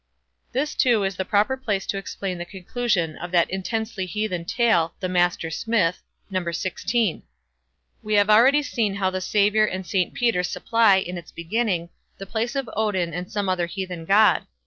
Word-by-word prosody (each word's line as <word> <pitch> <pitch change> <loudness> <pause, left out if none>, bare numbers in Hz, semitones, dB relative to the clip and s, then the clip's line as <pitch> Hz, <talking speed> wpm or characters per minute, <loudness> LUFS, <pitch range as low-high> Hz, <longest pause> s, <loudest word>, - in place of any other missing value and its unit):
This, 285 +4 -1
too, 235 -5 +3
is 195 0 -1
the 190 - -3
proper 210 +6 +2
place 210 -7 -2
to 195 - -2
explain 190 -2 -5
the - - -3
conclusion 190 - -2
of 175 - -6
that 170 -1 +3
intensely 195 0 -3
heathen 185 -3 -3
tale, 205 -6 +2
"the 185 - -2
Master 175 -2 +1
Smith", 185 -2 0 0.3
No. 185 -2 -1
xvi. 185 +4 -1 0.8
We 215 -1 -1
have 205 0 +4
already 265 +7 +6
seen 225 -8 -1
how 190 -2 0
the 185 0 -3
Saviour 210 +3 +3
and 185 -1 -4
St 180 0 -1
Peter 235 -7 +2
supply, 225 +3 +3
in 180 -2 -2
its 170 - -14
beginning, 175 -1 -1 0.3
the 195 - -7
place 230 +6 -2
of 270 -3 -2
Odin 190 -6 0
and 180 +2 -5
some 205 -2 -2
other 180 -2 0
heathen 180 -2 -5
god. 205 +4 +4
195 Hz, 175 wpm, -23 LUFS, 180-220 Hz, 0.8 s, already